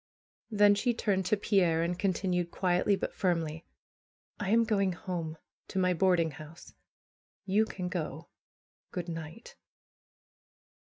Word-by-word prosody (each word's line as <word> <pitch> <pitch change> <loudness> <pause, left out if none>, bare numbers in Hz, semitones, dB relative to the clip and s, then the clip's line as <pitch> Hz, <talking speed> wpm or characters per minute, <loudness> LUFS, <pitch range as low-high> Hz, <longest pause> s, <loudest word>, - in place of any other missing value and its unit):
Then 205 -2 +5
she 240 +4 +1
turned 190 -5 0
to 215 - +2
Pierre, 180 -5 +2
and 175 +1 -2
continued 180 -3 0
quietly, 185 +3 +2
but - - -4
firmly: 165 -4 -1 0.7
"1 200 - -2
am 230 +2 +5
going 200 -4 +1
home, 165 -3 -5 0.3
to - - -6
my 180 -1 +3
boarding 175 -2 +3
house. 155 +3 -12 0.7
You 205 +3 +3
can 185 -4 -5
go! 165 -3 -4 0.6
Good 180 -2 -5
night 165 +5 -8
180 Hz, 125 wpm, -30 LUFS, 165-200 Hz, 0.7 s, Then